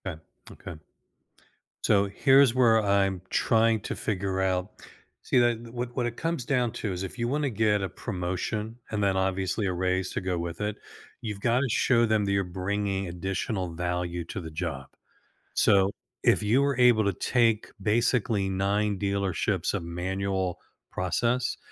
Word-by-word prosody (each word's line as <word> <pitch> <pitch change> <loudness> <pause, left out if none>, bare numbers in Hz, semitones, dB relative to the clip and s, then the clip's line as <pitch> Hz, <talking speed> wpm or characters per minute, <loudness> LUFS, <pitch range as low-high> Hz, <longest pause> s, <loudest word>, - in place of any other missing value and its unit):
Eh, 90 -5 -5 0.3
okay. 80 -2 -10 1.0
So, 100 -1 +4
here's 135 +4 +5
where 120 -3 +5
I'm 100 -2 +1
trying 115 -1 +3
to - - -4
figure 95 -2 -2
out. 95 0 0 0.5
See, - - +1
eh, 120 0 +3 0.2
what 120 0 -5
what 125 - 0
it 120 0 -3
comes 165 -5 -2
down 125 -4 +1
to 105 - -3
is 90 - -5
if 95 +5 -6
you 120 -1 -1
wanna 145 +2 0
get 105 -3 +1
a 95 - -2
promotion 100 +3 -3 0.2
and 105 -1 -1
then 95 -1 +2
obviously 95 +2 0
a 95 - 0
raise 95 +1 -1
to - - -3
go 90 -1 -1
with 85 +2 -5
it, 105 0 -1 0.5
you've 105 -3 -5
got 120 +3 +2
to 140 - +1
show 120 +1 +3
them 110 -2 +1
that 100 - -1
you're 100 0 +2
bringing 95 +2 -2
additional 90 +2 -3
value 90 0 -2
to 90 +3 -6
the 80 -1 -8
job. 75 -5 -4 0.7
So 95 0 +4 0.3
if - - +4
you 115 +6 +3
were 140 -2 +1
able 120 -3 +5
to 100 - +1
take 115 +2 +1
basically 110 -1 +1
9 100 +2 0
dealerships 100 -2 0
of 100 -4 -2
manual 95 +2 -2 0.3
process 120 +7 0
100 Hz, 165 wpm, -27 LUFS, 95-115 Hz, 1.0 s, here's